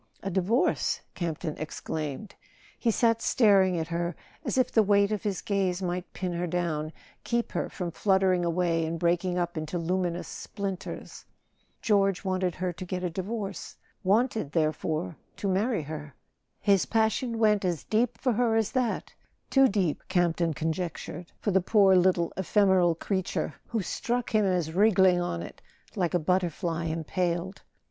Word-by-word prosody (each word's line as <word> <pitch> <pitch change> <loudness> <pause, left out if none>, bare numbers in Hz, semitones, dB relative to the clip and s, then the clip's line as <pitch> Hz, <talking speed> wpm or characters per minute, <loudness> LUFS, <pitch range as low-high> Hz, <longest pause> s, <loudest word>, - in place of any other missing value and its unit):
" - - -30
"A 195 - -2
divorce?" 195 +7 +1
Campton 165 -2 -3
exclaimed. 155 +3 -5 0.5
He 235 - +1
sat 230 0 +2
staring 195 -6 +4
at 160 0 -3
her 170 0 -2 0.3
as - - -2
if 255 - +2
the 225 - +5
weight 200 0 +3
of 210 - -1
his 205 -3 -2
gaze 190 -3 0
might 180 -1 -3
pin 180 -2 -3
her 175 +1 -2
down, 160 -3 -1 0.3
keep 235 0 -1
her - - -2
from 175 -3 -4
fluttering 190 -1 +2
away 170 -1 +1
and 160 +1 -2
breaking 175 +2 +1
up 175 -1 -2
into 155 +3 -4
luminous 175 0 -1
splinters. 195 -2 -6 0.6
George 195 -4 +2
wanted 185 -2 0
her 180 -1 -2
to 170 - -7
get 180 0 -4
a 180 - -1
divorce 195 +3 -5 0.3
—wanted, 210 - +1
therefore, 155 +1 -1 0.2
to 200 - -3
marry 200 0 +1
her! 150 -2 -7 0.4
His 200 -3 +3
passion 225 +2 +1
went 210 -2 +3
as 175 -4 -1
deep 225 +2 0
for 255 -3 +1
her 230 0 +2
as 225 -2 +1
that—too 260 +2 0
deep, 190 - 0
Campton 170 -2 +1
conjec¬ 165 +2 -2
tured, 175 +1 -8
for 205 - -1
the 190 0 +3
poor 195 0 +5
little 180 -2 +3
ephemeral 190 -3 +3
creature, 190 +2 -2
who 225 -4 -2
struck 240 +6 -2
him 215 -1 +4
as 175 -4 0
wriggling 190 -2 +4
on 85 - -2
it - - -10 0.3
like 180 -3 0
a - - +6
butterfly 170 -1 0
impaled. 170 +3 -2
185 Hz, 160 wpm, -28 LUFS, 170-205 Hz, 0.6 s, a